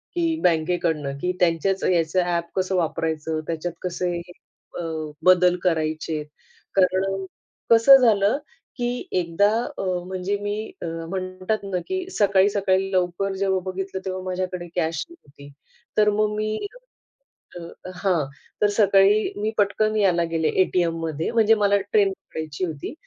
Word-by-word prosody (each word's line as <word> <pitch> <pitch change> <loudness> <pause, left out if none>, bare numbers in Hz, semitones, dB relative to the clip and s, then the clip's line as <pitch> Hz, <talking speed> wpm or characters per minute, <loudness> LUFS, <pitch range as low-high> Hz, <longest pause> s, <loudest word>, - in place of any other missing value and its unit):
की 335 -2 +1
बँकेकडनं 160 -4 +1
की 180 - 0
त्यांच्याच 180 +2 +1
याचं 170 0 +2
ॲप 170 -1 0
कसं 190 0 0
वापरायचं, 160 -2 -1
त्याच्यात 170 +1 -3
कसे 175 -1 -2 0.6
अ, - - -2 0.4
बदल 180 -1 +6
करायचेत. 155 -2 -1 0.5
कारण 195 +1 +1 0.5
कसं 230 +4 +9
झालं 220 -2 +3 0.4
की 240 0 -1 0.3
एकदा 175 +4 +2 0.3
अ, - - -3 0.2
म्हणजे 190 +2 -2
मी 205 0 -2 0.3
अ, - - -4 0.2
म्हणतात 185 +3 -3
ना 190 -2 -2
की 375 -1 -2
सकाळी 200 - +3
सकाळी 195 -1 +1
लवकर 185 +1 0
जेव्हा 190 -1 +1
बघितलं 190 0 -5
तेव्हा 185 0 -4
माझ्याकडे 185 -1 -3
कॅश 160 -2 -1
नव्हती. 145 - -16 0.5
तर 210 0 +5
मग 210 0 +1
मी, 215 0 -1 1.0
अ, - - -6 0.4
हां 180 -6 +2 0.4
तर 210 - +5
सकाळी 200 +1 +4
मी 210 +1 -1
पटकन 215 +1 +2
यायला 180 -5 +3
गेले 160 -1 +1
एटीएममध्ये 165 -4 -1
म्हणजे 225 -1 +5
मला 200 0 +4 0.2
ट्रेन 200 -2 +4
पकडायची 160 -4 -6
होती. 155 -5 -5
185 Hz, 135 wpm, -23 LUFS, 170-200 Hz, 1.0 s, कसं